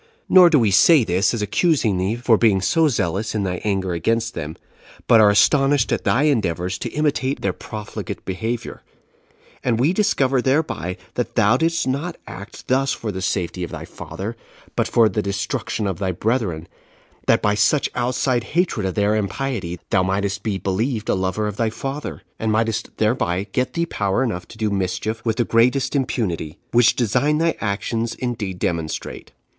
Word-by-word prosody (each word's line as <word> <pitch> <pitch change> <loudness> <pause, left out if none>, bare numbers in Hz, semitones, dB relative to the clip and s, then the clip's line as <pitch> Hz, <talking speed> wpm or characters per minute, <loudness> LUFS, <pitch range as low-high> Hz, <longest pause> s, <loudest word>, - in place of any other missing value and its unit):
Nor 180 -2 +8
do 160 - +4
we 110 -6 +3
say 140 - +6
this 95 0 +1
as 115 -3 -2
accusing 110 - +1
thee 95 +5 0
for 120 -1 +3
being 105 -3 +3
so 160 - +3
zealous 110 - -1
in 105 - 0
thy 90 -2 -2
anger 95 -3 -1
against 115 +7 0
them, 80 -1 -5 0.5
but 115 - +6
are 105 - +7
astonished 135 +5 +3
at - - -1
thy 135 - +3
endeavors 95 - 0
to 120 - -3
imitate 140 -1 -1
their 95 -2 0
profligate 105 -1 -7
behavior; 110 +5 -4 0.8
and 115 -3 +1
we 145 +8 +3
discover 135 -10 +2
thereby 130 - -1 0.2
that 125 - -3
thou 115 0 +4
didst 165 +2 0
not 145 +7 -2
act 100 +3 -10
thus 135 +1 +2
for 110 - -4
the 95 -1 -5
safety 90 -1 -2
of 85 - -4
thy - - -7
father, 95 +8 -7 0.4
but - - +1
for 115 -2 +4
the 105 - -1
destruction 100 +2 -2
of 95 -2 -2
thy 95 -2 0
brethren, 95 -4 -1 0.6
that - - +3
by 105 - +3
such 105 +8 +2
outside 125 0 0
hatred 170 - +1
of 95 - -4
their 105 +1 +2
impiety 105 -4 -3
thou 95 - +4
mightest 100 +2 -1
be 105 -3 -2
believed 105 +4 -2
a - - +3
lover 95 +3 -1
of 105 -1 -5
thy 115 -2 +1
father, 135 +6 -5 0.2
and 110 -1 0
mightest 110 +1 0
thereby 105 -5 0
get 125 +3 -1
thee 170 0 0
power 100 - 0
enough 90 -8 -3
to 115 - -13
do 110 -2 -1
mischief 100 +4 -2
with 115 -2 0
the 120 0 +1
greatest 125 +6 +2
impunity; 100 - -2
which 120 -1 +5
design 125 +6 +1
thy 165 +1 +1
actions 115 +3 -2
indeed 110 -7 -4
demonstrate. 80 -3 -4
110 Hz, 180 wpm, -21 LUFS, 95-130 Hz, 0.8 s, Nor